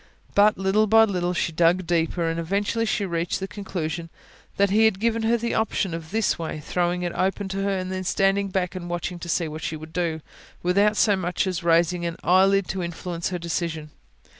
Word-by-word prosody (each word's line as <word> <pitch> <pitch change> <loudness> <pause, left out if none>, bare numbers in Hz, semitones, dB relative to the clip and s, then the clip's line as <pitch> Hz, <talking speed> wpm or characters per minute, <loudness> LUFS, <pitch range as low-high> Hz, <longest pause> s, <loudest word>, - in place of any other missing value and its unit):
But, 210 +1 +5
little 195 +3 +2
by 225 +2 +6
little, 180 -4 -1
she 170 - 0
dug 170 +3 +2
deeper, 170 0 0
and 165 0 -1
eventually 200 +6 -1
she 210 -1 0
reached 170 -1 -2
the 190 - -4
[P.265] - - -34
conclusion 170 -5 -4 0.5
that 200 -1 +3
He 220 +2 +5
had 220 -4 +2
given 230 +1 +1
her 225 +2 +2
the 235 0 -2
option 215 -4 0
of 165 -1 -6
this 220 -1 0
way, 160 -1 -4
throwing 175 +3 -1
it 175 - -2
open 190 +1 -1
to 195 +1 -3
her 195 -1 0
and 185 0 -4
then 185 0 -3
standing 195 +2 +1
back 185 -1 -1
and 180 -2 -6
watching 175 +1 -3
to 170 - -7
see 170 -1 0
what 155 +1 -7
she 155 - -3
would 155 +1 -11
do, 170 -3 -1 0.4
without 200 +4 +3
so 205 -2 +4
much 180 0 -1
as 185 -2 -3
raising 170 +1 +2
an 170 - -4
eyelid 190 +2 +4
to 190 - -2
influence 170 0 -4
her 180 - -3
decision. 165 -2 -3
180 Hz, 215 wpm, -24 LUFS, 170-200 Hz, 0.5 s, by